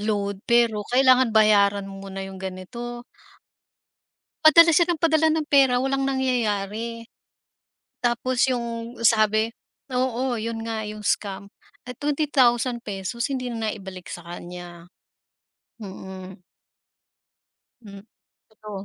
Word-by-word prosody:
load 200 Hz, -2 st, -2 dB
pero 230 Hz, -3 st, +3 dB
kailangan 255 Hz, -2 st, +5 dB
bayaran 205 Hz, -2 st, +4 dB
mo 195 Hz, 0 st, -9 dB
muna 195 Hz, 0 st, -6 dB
yung 190 Hz, 0 st, -9 dB
ganito." 235 Hz, +6 st, -7 dB, 1.4 s
Padala 335 Hz, +2 st, +8 dB
siya 345 Hz, +2 st, +4 dB
ng 345 Hz, -, +1 dB
padala 320 Hz, -1 st, +3 dB
ng 315 Hz, -1 st, 0 dB
pera 270 Hz, -4 st, +4 dB
walang 270 Hz, +1 st, 0 dB
nangyayari. 230 Hz, -3 st, -2 dB, 1.0 s
Tapos 245 Hz, +2 st, +1 dB
yung 235 Hz, -1 st, -3 dB
sabi 215 Hz, 0 st, +3 dB, 0.4 s
oo 250 Hz, 0 st, 0 dB
yun 225 Hz, 0 st, -4 dB
nga 225 Hz, -1 st, -3 dB
yung 210 Hz, 0 st, -8 dB
scam, 200 Hz, 0 st, -2 dB, 0.3 s
at 250 Hz, -, -7 dB
₱20,000 240 Hz, -7 st, 0 dB
hindi 255 Hz, -2 st, -3 dB
na 225 Hz, -1 st, -2 dB
naibalik 190 Hz, -3 st, -8 dB
sa 175 Hz, -, -8 dB
kanya. 175 Hz, 0 st, -9 dB, 1.0 s
Mm. 190 Hz, -1 st, -9 dB, 1.4 s
Hm 200 Hz, -2 st, -11 dB, 0.5 s
totoo. 210 Hz, -2 st, -9 dB
230 Hz, 110 wpm, -24 LUFS, 200-255 Hz, 1.4 s, Padala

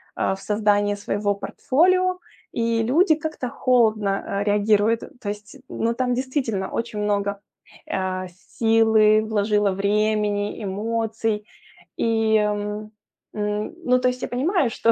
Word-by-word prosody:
а, -, -, 0 dB
в 195 Hz, -, -13 dB
создание 205 Hz, -1 st, +1 dB
своего 205 Hz, 0 st, -1 dB
портфолио, 365 Hz, -, +1 dB, 0.3 s
и 230 Hz, -1 st, 0 dB
люди 315 Hz, -, +4 dB
как-то 310 Hz, -5 st, -4 dB
холодно, 220 Hz, -6 st, +2 dB, 0.2 s
а, -, -, 0 dB
реагируют, 210 Hz, +2 st, +2 dB, 0.2 s
то 205 Hz, -, -4 dB
есть, 210 Hz, +5 st, -7 dB
ну, 230 Hz, +1 st, -1 dB
там 250 Hz, 0 st, 0 dB
действительно 250 Hz, -6 st, -2 dB
очень 230 Hz, -2 st, -3 dB
много, 200 Hz, -1 st, -1 dB, 0.5 s
а, 185 Hz, -1 st, -2 dB
силы 215 Hz, +3 st, +3 dB
вложила, 210 Hz, -1 st, +1 dB
времени, 205 Hz, +1 st, 0 dB
эмоций, 220 Hz, +1 st, -2 dB, 0.5 s
и, 225 Hz, -1 st, +2 dB
м, 210 Hz, 0 st, -2 dB, 0.4 s
м. 210 Hz, +4 st, -2 dB
Ну, 250 Hz, 0 st, +4 dB
то 250 Hz, -, +1 dB
есть, 250 Hz, 0 st, -5 dB
я -, -, -1 dB
понимаю, 285 Hz, -, +1 dB
что, 230 Hz, 0 st, +2 dB
215 Hz, 130 wpm, -23 LUFS, 205-235 Hz, 0.5 s, люди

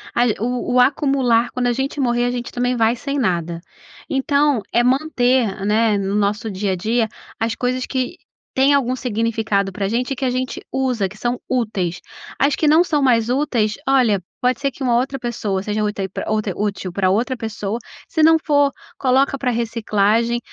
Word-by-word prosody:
a 240 Hz, -, +4 dB, 0.2 s
o 245 Hz, +2 st, -2 dB
o 250 Hz, -, +5 dB
acumular, 255 Hz, -3 st, +3 dB
quando 250 Hz, -1 st, -1 dB
a 240 Hz, -, +2 dB
gente 270 Hz, +3 st, -3 dB
morrer, 240 Hz, -2 st, +1 dB
a 245 Hz, -, 0 dB
gente 240 Hz, -1 st, -4 dB
também 245 Hz, +1 st, 0 dB
vai 230 Hz, 0 st, +2 dB
sem 280 Hz, +3 st, -4 dB
nada. 170 Hz, -6 st, -1 dB, 0.5 s
Então 280 Hz, -2 st, +2 dB
é 240 Hz, +1 st, +4 dB
manter, 250 Hz, -6 st, +1 dB
né, 215 Hz, 0 st, +2 dB
no 195 Hz, 0 st, -2 dB
nosso 210 Hz, +2 st, 0 dB
dia 195 Hz, 0 st, -2 dB
a -, -, -1 dB
dia, 220 Hz, +5 st, 0 dB, 0.3 s
as 225 Hz, 0 st, -1 dB
coisas 255 Hz, 0 st, -1 dB
que 260 Hz, +6 st, -3 dB, 0.4 s
tem 270 Hz, +2 st, +4 dB
algum 255 Hz, -2 st, +2 dB
significado 220 Hz, -4 st, -1 dB
pra 195 Hz, +1 st, -2 dB
gente 245 Hz, +5 st, -1 dB
e -, -, 0 dB
que 265 Hz, -, -3 dB
a 255 Hz, -, +2 dB
gente 255 Hz, 0 st, -3 dB
usa, 255 Hz, -7 st, 0 dB
que 210 Hz, +3 st, -13 dB
são 240 Hz, +2 st, -2 dB
úteis. 200 Hz, -8 st, -1 dB, 0.4 s
As 280 Hz, 0 st, +3 dB
que 310 Hz, -, 0 dB
não 315 Hz, +4 st, +6 dB
são 305 Hz, -4 st, 0 dB
mais 240 Hz, -4 st, +3 dB
úteis, 245 Hz, -6 st, 0 dB
olha, 240 Hz, -8 st, +3 dB, 0.2 s
pode 250 Hz, 0 st, +1 dB
ser 275 Hz, -1 st, 0 dB
que 270 Hz, -, -18 dB
uma 240 Hz, -2 st, +2 dB
outra 270 Hz, +2 st, -1 dB
pessoa 210 Hz, -5 st, -2 dB
seja 210 Hz, +1 st, -2 dB
úte 210 Hz, -1 st, -2 dB, 0.3 s
outra 215 Hz, -3 st, -1 dB
útil 200 Hz, -3 st, -3 dB
pra 185 Hz, -1 st, +1 dB
outra 240 Hz, +6 st, +1 dB
pessoa, 220 Hz, -1 st, -4 dB, 0.3 s
se 315 Hz, -2 st, +1 dB
não 325 Hz, 0 st, +7 dB
for, 285 Hz, -2 st, +3 dB, 0.3 s
coloca 270 Hz, +1 st, +2 dB
pra 250 Hz, -1 st, 0 dB
reciclagem, 230 Hz, 0 st, +1 dB
240 Hz, 190 wpm, -20 LUFS, 210-260 Hz, 0.5 s, não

